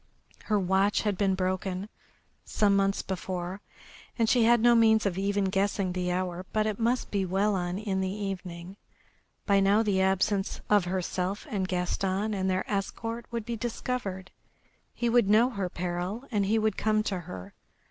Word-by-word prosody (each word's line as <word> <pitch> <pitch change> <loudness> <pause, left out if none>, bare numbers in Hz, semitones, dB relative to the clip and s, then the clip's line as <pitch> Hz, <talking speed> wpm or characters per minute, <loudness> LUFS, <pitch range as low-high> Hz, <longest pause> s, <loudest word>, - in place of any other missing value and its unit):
Her 210 -2 +2
watch 190 +2 +2
had 210 -2 0
been 195 0 +1
broken 185 +1 -2 0.6
some 205 -2 +2
months 195 0 +1
before, 185 0 -4 0.6
and 230 -2 +2
she 235 0 +4
had 240 +1 +5
no 240 +2 +5
means 220 -2 +4
of 195 -3 0
even 200 +1 0
guessing 195 0 0
the 180 -1 -1
hour, 180 0 -2
but 215 0 +2
it 215 0 -2
must 240 +2 0
be 200 -2 +1
well 195 +3 +1
on 180 -1 -2
in 195 -2 -2
the 190 - -1
evening. 190 -2 -6 0.7
By 200 -1 +4
now 200 +3 +4
the 200 -3 +1
absence 195 +1 +1
of 205 -3 +5
herself 185 +2 -2
and 190 -3 -1
Gaston 190 +3 -1
and 190 -1 -1
their 185 0 -1
escort 225 +3 -3
would 235 -2 -4
be 235 0 -3
discovered. 220 -5 -4 0.6
He 240 - -2
would 235 -3 +3
know 230 +5 +5
her 195 -6 -3
peril 180 +6 -3
and 205 -3 +1
he 220 +2 +2
would 215 -2 +1
come 215 -1 +1
to 195 -3 -2
her. 95 - -9
195 Hz, 175 wpm, -28 LUFS, 185-215 Hz, 0.7 s, had